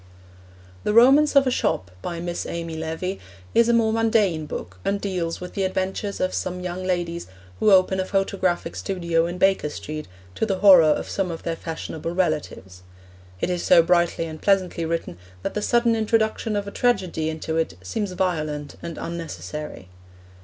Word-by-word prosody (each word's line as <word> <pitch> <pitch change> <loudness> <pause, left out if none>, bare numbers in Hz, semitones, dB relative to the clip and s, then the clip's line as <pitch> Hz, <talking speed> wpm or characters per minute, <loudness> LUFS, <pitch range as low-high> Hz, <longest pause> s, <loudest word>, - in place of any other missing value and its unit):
The 210 - 0
Romance 275 +6 +6
of 275 -1 +6
a 255 - +1
Shop, 90 - -1
by 170 -1 -4
Miss 175 0 -4
Amy 165 -1 -4
Levy, 160 +4 -4 0.3
is 235 0 +4
a - - +4
more 225 -1 +3
mundane 215 -8 +2
book, 90 -8 -7
and 200 0 0
deals 180 -4 -2
with 180 0 -8
the 200 - -2
adventures 190 +2 -2
of 185 - 0
some 180 0 -3
young 180 0 -4
ladies 175 -2 -2 0.3
who - - +4
open 190 0 +4
a 185 - 0
photographic 190 -2 -1
studio 170 -3 0
in 175 +1 -5
Baker 190 -4 +2
Street 155 +1 -6 0.3
to - - -3
the 200 -4 +1
horror 190 -3 +8
of 150 - +1
some 195 -2 -1
of 165 -1 -6
their 165 - -2
fashionable 165 0 -5
relatives. 150 - -2 0.6
It 180 - 0
is 175 -1 -1
so 170 -2 +6
brightly 170 -1 +2
and 155 -1 -8
pleasantly 185 -4 +1
written 160 - -3 0.2
that - - -2
the 210 - -2
sudden 235 +1 +3
introduction 220 0 0
of 200 0 -2
a - - -5
tragedy 185 -11 0
into 160 0 -3
it 165 - -1
seems 195 - -3
violent 155 -6 -2
and 170 -2 -6
unnecessary. 155 - -6
180 Hz, 175 wpm, -23 LUFS, 165-200 Hz, 0.6 s, horror